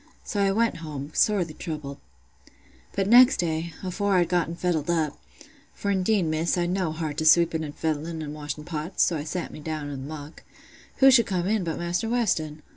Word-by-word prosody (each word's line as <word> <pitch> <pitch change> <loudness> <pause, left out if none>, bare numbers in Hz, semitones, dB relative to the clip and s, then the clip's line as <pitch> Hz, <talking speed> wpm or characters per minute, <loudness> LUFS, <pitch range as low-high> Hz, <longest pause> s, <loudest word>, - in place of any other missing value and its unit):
So 205 - -2
I 195 - +3
went 230 +3 +1
home, 150 -3 -7
sorely 185 -7 +2
troubled. 150 -4 -6 0.9
"But 195 -1 0
next 250 +4 +7
day, 165 0 -2
afore 195 +2 0
I'd 175 -2 +3
gotten 170 -2 0
fettled 170 -3 -1
up—for 150 - -4
indeed, 195 +1 +2
Miss, 160 +2 0
I'd 175 0 0
no 185 -3 0
heart 155 -2 -4
to 155 - -1
sweeping 165 0 +4
an' 145 -1 -6
fettling, 160 +1 -3
an' 150 -1 -6
washing 150 0 -6
pots; 160 +3 -1
so 170 - +1
I 150 - -3
sat 175 +3 -4
me - - -8
down 150 -1 -5
i' - - -5
th' - - -6
muck—who 155 - -2
should 235 -4 +5
come 180 -3 -1
in 210 0 +1
but 165 -2 -3
Maister 175 +6 -2
Weston! 160 -11 -1
165 Hz, 190 wpm, -25 LUFS, 155-190 Hz, 0.9 s, next